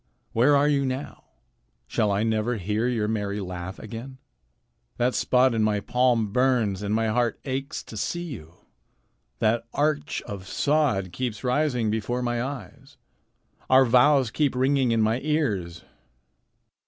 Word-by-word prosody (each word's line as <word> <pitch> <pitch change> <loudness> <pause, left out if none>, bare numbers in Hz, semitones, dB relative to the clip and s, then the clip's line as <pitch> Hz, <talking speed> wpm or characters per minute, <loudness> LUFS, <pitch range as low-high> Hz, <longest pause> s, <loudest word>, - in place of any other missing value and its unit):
Where 130 +6 +4
are 145 +1 +3
you 140 -2 +2
now? 130 +2 -5 0.6
Shall 105 - 0
I 100 +2 +1
never 110 +1 0
hear 105 +5 -1
your 115 -4 0
merry 105 -2 -2
laugh 90 -1 -6
again? 115 +5 -8 0.8
That 125 +1 +1
spot 130 0 +3
in 110 - 0
my 105 -1 +2
palm 120 -1 +1
burns, 120 -7 +2
and 105 +1 -1
my 110 0 +1
heart 120 +1 0
aches 135 +3 -4
to - - -11
see 175 +11 -2
you. 90 - -9 0.8
That 115 +1 +1
arch 150 0 0
of 100 -4 -8
sod 140 - +1
keeps 120 +2 -4
rising 125 -4 +1
before 120 +3 -2
my 120 -1 -1
eyes. 135 +2 -8 0.7
Our 130 0 +6
vows 125 0 +4
keep 145 0 0
ringing 130 -1 +2
in 115 -1 +2
my 110 +3 +1
ears." 110 - -1
120 Hz, 145 wpm, -25 LUFS, 105-135 Hz, 0.8 s, Our